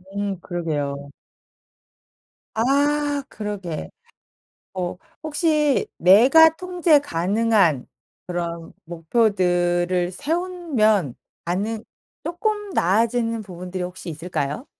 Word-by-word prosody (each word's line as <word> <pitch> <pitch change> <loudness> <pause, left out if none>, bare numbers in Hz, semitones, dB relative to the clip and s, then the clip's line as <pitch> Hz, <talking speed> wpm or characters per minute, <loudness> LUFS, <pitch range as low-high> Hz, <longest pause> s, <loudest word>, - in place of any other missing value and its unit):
음 200 -2 -2
그러게요. 145 -5 -3 1.5
아 285 +4 +1
그러게. 200 -7 -5 0.8
어 180 -1 -3 0.3
혹시 305 -2 +1
내가 265 - +7
통제 355 -4 +3
가능한 195 - +1 0.4
그런 170 -2 -4
목표들을 175 -1 +1
세우면 280 - 0 0.3
가능 210 +6 -2 0.4
쪼끔 415 +3 -2
나아지는 230 - +1
부분들이 180 -1 -6
혹시 180 0 -7
있을까요? 165 - -4
205 Hz, 185 characters per minute, -22 LUFS, 175-285 Hz, 1.5 s, 내가